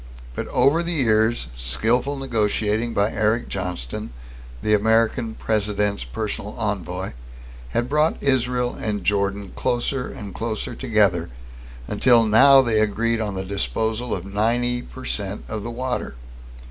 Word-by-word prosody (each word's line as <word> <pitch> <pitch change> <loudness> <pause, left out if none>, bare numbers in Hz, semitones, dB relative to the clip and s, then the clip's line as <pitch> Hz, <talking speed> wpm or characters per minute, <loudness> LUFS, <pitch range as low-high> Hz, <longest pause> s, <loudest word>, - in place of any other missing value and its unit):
But - - -4
over 155 +5 +3
the 170 0 -2
years, 110 - +2
skillful 115 - 0
negotiating 115 -2 0
by 100 +2 +2
Eric 110 +2 0
Johnston, 90 -10 -4 0.5
the 105 - +2
American 110 +2 +2
President's 105 - 0
personal 105 - -4
envoy, 95 -4 -3 0.6
had 120 - -1
brought 150 +4 +2
Israel 125 -2 +1
and 105 -3 -3
Jordan 100 0 0
closer 125 +2 -1
and 100 -3 -8
closer 110 +1 -3
together 105 -9 +1 0.6
until 115 +2 +4
now 135 +5 +7
they 115 -3 +2
agreed 115 +2 +1
on 105 -3 -3
the 95 0 -3
disposal 110 +4 -1
of 90 - -6
ninety 120 +5 +1
per 130 +1 -11
cent 100 -1 -3
of 110 -1 -4
the 115 - -5
water. 125 - -3
110 Hz, 135 wpm, -23 LUFS, 100-120 Hz, 0.6 s, now